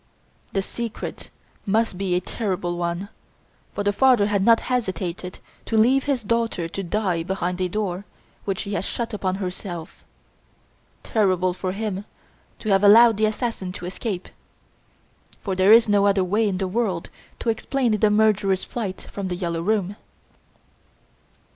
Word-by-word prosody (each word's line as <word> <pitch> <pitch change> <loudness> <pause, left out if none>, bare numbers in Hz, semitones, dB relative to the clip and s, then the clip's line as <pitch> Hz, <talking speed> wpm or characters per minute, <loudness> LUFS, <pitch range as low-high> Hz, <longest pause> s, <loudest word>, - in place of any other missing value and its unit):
The 195 - 0
secret 230 +2 -6 0.3
must 220 0 +1
be 185 -1 -1
a - - +3
terrible 185 -6 -2
one, 175 +3 -3 0.7
for 205 - -1
the 205 0 +1
father 250 -2 +4
had 200 -2 +1
not 230 +2 +5
hesitated 190 -7 -3 0.3
to 225 - 0
leave 255 +5 +4
his 275 -5 0
daughter 225 -5 0
to 185 +4 -5
die 185 -2 -1
behind 180 +1 -2
a 180 - 0
door 195 -1 -3 0.4
which 195 -2 -2
she 205 -1 -5
had 175 - -1
shut 230 +3 -3
upon 190 -3 -1
herself, 180 -3 -6 1.0
terrible 185 -4 +1
for 185 0 -3
him 205 -1 -3 0.5
to 215 - -5
have 195 0 +3
allowed 225 +2 +8
the 215 0 +3
assassin 215 -4 -3
to 180 - -7
escape. 190 0 -4 1.1
For 195 - -3
there 190 +2 +4
is 230 0 +8
no 205 -1 +4
other 195 -1 +3
way 210 +4 +1
in 190 -2 -1
the 190 0 -1
world 190 -4 -2 0.3
to 235 - -2
explain 245 +2 0
the 215 0 +3
murderer's 210 -3 +2
flight 205 -6 -5
from 200 -2 -4
"The 180 - -2
Yellow 170 -2 -2
Room"!" 205 +1 0
200 Hz, 155 wpm, -23 LUFS, 185-220 Hz, 1.1 s, allowed